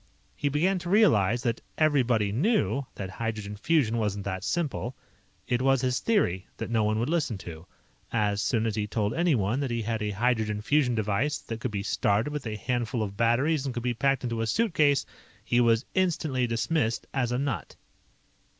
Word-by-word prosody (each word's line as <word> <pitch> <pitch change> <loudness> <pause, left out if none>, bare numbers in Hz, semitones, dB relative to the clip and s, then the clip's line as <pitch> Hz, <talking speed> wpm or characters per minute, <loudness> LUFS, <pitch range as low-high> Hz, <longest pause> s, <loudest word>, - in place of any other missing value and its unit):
"He 145 - -1
began 180 +7 +1
to 175 0 -6
realize 120 - +4
that 115 -1 -1 0.2
'everybody 125 -9 +2
knew' 140 - +1
that 95 -2 -5
hydrogen 110 -1 -4
fusion 115 -1 +1
wasn't 105 -2 -2
that 95 -1 -3
simple. 140 -6 -2 0.5
It 125 -1 0
was 135 0 +3
his 125 -1 +1
theory 95 - +1
that - - -5
no 110 -2 +2
one 105 +1 +1
would 115 +3 0
listen 150 -9 0
to. 85 -2 -10 0.4
As 105 -2 +1
soon 115 -2 +1
as 110 -2 -1
he 105 -1 -1
told 105 0 -1
anyone 135 - +1
that 140 -2 -1
he 115 -1 -2
had 110 0 -2
a 105 - -1
hydrogen 105 0 0
fusion 135 -2 +2
device 110 +7 0
that 115 -1 -7
could 125 - -2
be 100 -2 -3
started 105 +7 +1
with 145 -5 -4
a 110 - -3
handful 120 +1 -1
of 100 -2 -5
batteries 130 +7 +2
and 130 - -3
could 120 - -3
be 125 -1 0
packed 135 +3 +1
into 115 -2 -2
a 115 - -1
suitcase, 155 - +2 0.4
he 120 - +3
was 115 +1 +3
instantly 155 -9 +1
dismissed 115 +1 0
as 125 -3 0
a 125 - 0
nut. 140 -2 -3
120 Hz, 190 wpm, -27 LUFS, 110-140 Hz, 0.5 s, realize